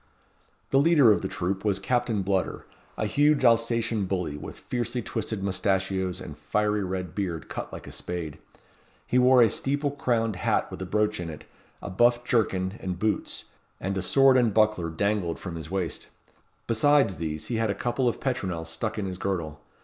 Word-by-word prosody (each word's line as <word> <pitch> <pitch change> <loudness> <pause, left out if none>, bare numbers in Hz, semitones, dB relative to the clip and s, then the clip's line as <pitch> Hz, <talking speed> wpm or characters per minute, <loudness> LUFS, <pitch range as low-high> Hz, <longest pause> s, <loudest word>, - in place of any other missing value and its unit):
The 135 - +5
leader 145 -6 +6
of 105 - +2
the 95 - -2
troop 95 +1 -2
was 100 -3 +1
Captain 115 0 0
Bludder, 95 -1 -1 0.3
a - - -1
huge 145 +4 +3
Alsatian 115 -2 +2
bully, 90 -5 -2
with 75 - -8
fiercely 120 0 -3
twisted 110 -3 -3
moustachios, 95 -1 0
and - - -8
fiery 105 -1 0
red 90 -2 -4
beard 90 -5 -3
cut - - -5
like - - -8
a - - -9
spade. 80 -4 -5 0.7
He 125 - +2
wore 125 -1 +6
a - - +6
steeple 145 +1 -1
crowned 115 -7 0
hat - - 0
with - - -7
a 95 - -4
brooch 105 +2 +1
in 85 -1 -4
it, 75 - -8 0.4
a - - -5
buff 120 +5 +3
jerkin 105 -4 0
and 90 -2 -4
boots, 105 +3 -1 0.3
and 95 +1 -2
a 95 - -1
sword 130 +9 +5
and 120 -3 +3
buckler 105 -5 +2
dangled 100 0 -1
from 90 - -7
his 80 -1 -7
waist. 95 -2 -3 0.6
Besides 120 - +3
these, 80 -2 -4
he 120 - 0
had 110 -1 +1
a 100 - 0
couple 125 +1 0
of 120 - 0
petronels 90 -11 -2
stuck 110 +8 -3
in 105 - -2
his 95 -1 -5
girdle. 85 -7 -3
100 Hz, 185 wpm, -27 LUFS, 90-120 Hz, 0.7 s, leader